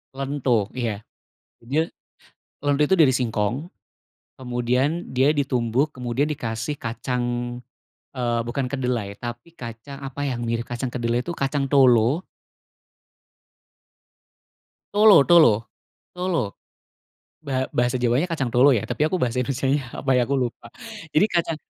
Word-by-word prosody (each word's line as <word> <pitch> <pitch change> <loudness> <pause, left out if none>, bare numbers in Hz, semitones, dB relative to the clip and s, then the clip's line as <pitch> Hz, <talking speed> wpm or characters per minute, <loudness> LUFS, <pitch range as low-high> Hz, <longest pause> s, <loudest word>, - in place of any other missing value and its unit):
Lento, 135 -6 0
iya, 115 -4 -3 0.5
dia. 145 +8 -1 0.7
Lento 145 0 +2
itu 190 - +3
dari 160 -7 +5
singkong. 120 +2 -1 0.7
Kemudian 125 +6 -1
dia 130 +3 +3
ditumbuk, 135 0 0
kemudian 125 +3 -1
dikasih 120 -2 -3
kacang, 120 +1 -3 0.9
eee, 120 -2 0
bukan 130 +3 -2
kedelai, 125 -7 -2
tapi 120 +7 -7
kacang 120 +1 -9
apa 135 +1 -5
yang 125 -4 -2
mirip 115 0 -2
kacang 120 +1 -4
kedelai 120 -1 -1
tu, 175 - -3
kacang 140 -1 -1
tolo. 130 +3 +4 2.7
Tolo 205 -8 +7
tolo 120 -11 +5 0.4
tolo, 180 - -2 0.8
ba 135 -4 -1
bahasa 120 +1 +1
Jawanya 125 +7 +1
kacang 135 -8 -2
tolo, 130 +2 +5
ya. 105 - -2
Tapi 125 - -5
aku 185 - 0
bahasa 125 -6 0
Indonesianya, 135 +1 -1 0.2
apa 135 - +3
yah, 125 -2 +2
aku 140 - +1
lupa. 125 -3 -3 0.4
Jadi 155 +4 +3
kacang, 170 -2 0
130 Hz, 125 wpm, -23 LUFS, 120-145 Hz, 2.7 s, Tolo